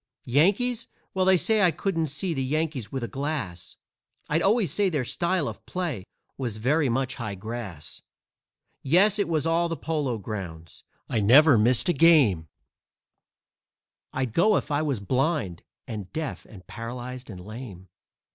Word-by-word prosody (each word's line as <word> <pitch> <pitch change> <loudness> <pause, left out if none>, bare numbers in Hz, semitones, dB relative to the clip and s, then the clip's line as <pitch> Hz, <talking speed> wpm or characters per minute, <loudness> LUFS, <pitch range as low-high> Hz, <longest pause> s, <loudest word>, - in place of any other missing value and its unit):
Yankees? 205 - +2 0.3
Well, 190 0 +4
say, 215 +4 +2
I 185 - +6
couldn't 165 -2 -1
see 165 +5 -3
the 135 -3 -2
Yankees 145 -4 -2
with 135 -2 -3
a - - -2
glass; 130 - -4 0.5
I'd 160 +3 +2
always 210 0 +2
say 205 -2 +2
their 145 -7 -1
style 170 +2 0
of - - -7
play 165 - -3 0.3
was 120 -5 -3
very 135 +6 +2
much 130 +2 -1
high 110 -5 -4
grass. 105 -5 -7 0.8
Yes, 195 +8 +4
it 200 - +1
was 155 -2 0
all 170 +1 +2
the 165 - -3
Polo 145 -5 -2
Grounds 90 -6 -7 0.2
I 115 - 0
never 135 +8 +7
missed 120 - +3
a 175 - +3
game; 140 - +5 1.6
I'd 130 -4 -2
go 210 - +4
if - - -4
I 145 +1 +1
was 140 -7 -1
blind 130 - -1 0.3
and 105 -5 -6
deaf 155 -2 -5
and 95 -4 -13
paralyzed 125 +2 -7
and 95 -4 -8
lame. 100 -2 -9
135 Hz, 155 wpm, -26 LUFS, 110-165 Hz, 1.6 s, never